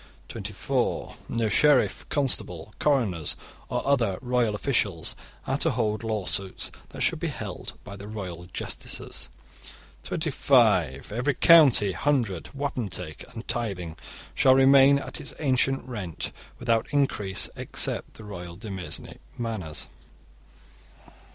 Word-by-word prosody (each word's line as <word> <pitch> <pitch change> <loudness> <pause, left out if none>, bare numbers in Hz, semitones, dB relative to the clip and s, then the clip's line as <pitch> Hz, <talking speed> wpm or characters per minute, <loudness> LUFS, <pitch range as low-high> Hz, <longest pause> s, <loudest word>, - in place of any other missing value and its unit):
(24) - - -2
No 115 -1 0
sheriff, 140 +6 +3
constable, 105 - 0
coroners, 110 - +2 0.3
or - - -2
other 115 -9 +2
royal 120 -4 +1
officials 100 - 0 0.3
are - - -1
to - - +3
hold 105 +1 -1
lawsuits 100 -3 -1 0.2
that - - -8
should - - +2
be - - -1
held - - -5
by 100 - -9
the 100 +1 -9
royal 95 -5 -6
justices. 90 - -5 0.7
(25) 65 +7 +2
Every 125 +5 0
county, 145 - +7
hundred, 110 - 0
wapentake, 120 - -4
and 115 0 -9
tithing 100 -9 -2 0.4
shall 130 -1 +5
remain 135 +1 +7
at 140 - -5
its 145 - -7
ancient 135 -2 +1
rent, 100 -10 -4 0.3
without 115 -2 +1
increase, 105 -9 +1
except - - +1
the 110 - -11
royal 90 -4 -7
demesne 95 -3 -4 0.2
manors. 110 -10 -3
110 Hz, 115 wpm, -26 LUFS, 95-135 Hz, 0.7 s, county